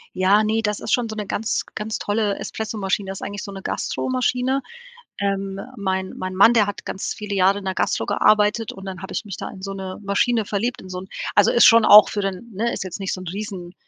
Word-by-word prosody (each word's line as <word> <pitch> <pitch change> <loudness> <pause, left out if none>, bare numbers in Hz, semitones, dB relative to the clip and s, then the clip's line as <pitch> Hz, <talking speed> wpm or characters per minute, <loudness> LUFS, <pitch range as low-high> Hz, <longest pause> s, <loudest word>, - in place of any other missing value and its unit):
Ja, 195 +3 +4
ne, 220 +1 +1
das 210 -1 -1
ist - - -3
schon 245 -4 +2
so 220 - -5
'ne 210 -1 -4
ganz 220 +3 -1
ganz 215 +1 -3
tolle 205 -1 0
Espressomaschine, 205 -3 -3
das 195 - -5
ist - - -15
eigentlich 205 0 -6
so 200 - -7
'ne 195 -1 -8
Gastromaschine. 255 +1 -1 0.6
Ähm, 195 -1 -2 0.2
mein 190 -2 -2
mein 185 0 -5
Mann, 225 +5 +6
der 215 -3 +4
hat 205 - -6
ganz 190 - -3
viele 210 -2 -5
Jahre 195 +1 +3
in 195 - -9
der 190 - -1
Gastro - - 0
gearbeitet 210 +1 +2
und 195 0 -10
dann 190 0 -7
habe 190 - -7
ich 215 - -4
mich 195 - -6
da - - -6
in 190 - -11
so 195 0 -5
'ne 190 -1 -6
Maschine 210 +2 +1
verliebt, 230 +4 -2
in 185 - -11
so 180 0 -5
'n 190 - -11 0.3
also, 205 - +5
ist 240 - +6
schon 230 -2 +7
auch 210 0 +9
für 205 - -3
den 195 +4 -4
ne, 230 +4 -1
ist - - -4
jetzt 185 +1 -7
nicht 195 - -2
so 185 - -4
'n 185 - -7
riesen 190 -2 -6
200 Hz, 245 wpm, -22 LUFS, 190-215 Hz, 0.6 s, auch